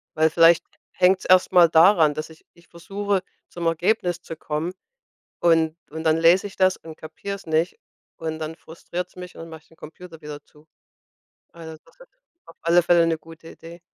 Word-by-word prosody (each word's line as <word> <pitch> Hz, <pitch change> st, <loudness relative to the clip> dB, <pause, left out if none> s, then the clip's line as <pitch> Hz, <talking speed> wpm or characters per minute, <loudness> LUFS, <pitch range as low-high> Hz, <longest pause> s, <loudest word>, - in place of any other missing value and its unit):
Weil 160 Hz, 0 st, +3 dB
vielleicht 165 Hz, 0 st, +5 dB, 0.3 s
hängt's 185 Hz, +1 st, +2 dB
erst 185 Hz, 0 st, +4 dB
mal 175 Hz, -2 st, +6 dB
daran, 165 Hz, -2 st, +5 dB
dass 155 Hz, +2 st, -6 dB
ich 160 Hz, 0 st, -18 dB
mich 170 Hz, 0 st, -23 dB
versuche, 195 Hz, +3 st, -3 dB, 0.3 s
zum 170 Hz, -1 st, -7 dB
Ergebnis 175 Hz, +1 st, 0 dB
zu 165 Hz, -, -9 dB
kommen, 155 Hz, +3 st, -4 dB, 0.7 s
und 165 Hz, -2 st, +2 dB, 0.2 s
und 160 Hz, +1 st, -6 dB
dann 160 Hz, 0 st, +3 dB
lese 170 Hz, +4 st, +4 dB
ich 195 Hz, -, -14 dB
das 185 Hz, -1 st, +2 dB
und 160 Hz, -1 st, -12 dB
kapier's 200 Hz, +5 st, -8 dB
nicht. 160 Hz, -, -1 dB, 0.4 s
Und 160 Hz, -1 st, -5 dB
dann 160 Hz, 0 st, -5 dB
frustriert's 175 Hz, +2 st, -8 dB
mich, 180 Hz, 0 st, -10 dB
und 165 Hz, -, -9 dB
mache 160 Hz, -1 st, -11 dB
ich -, -, -30 dB
den 165 Hz, -, -23 dB
Computer 165 Hz, +1 st, -13 dB
wieder 150 Hz, -1 st, -9 dB
zu. 150 Hz, +1 st, -24 dB, 0.9 s
Also, 160 Hz, -1 st, -10 dB
das -, -, -25 dB
ist -, -, -16 dB, 0.4 s
auf 165 Hz, -, -17 dB
alle 170 Hz, +1 st, +4 dB
Fälle 170 Hz, 0 st, +4 dB
'ne 165 Hz, -1 st, 0 dB
gute 165 Hz, +1 st, -15 dB
Idee. 170 Hz, +1 st, -13 dB
165 Hz, 185 wpm, -23 LUFS, 160-180 Hz, 0.9 s, mal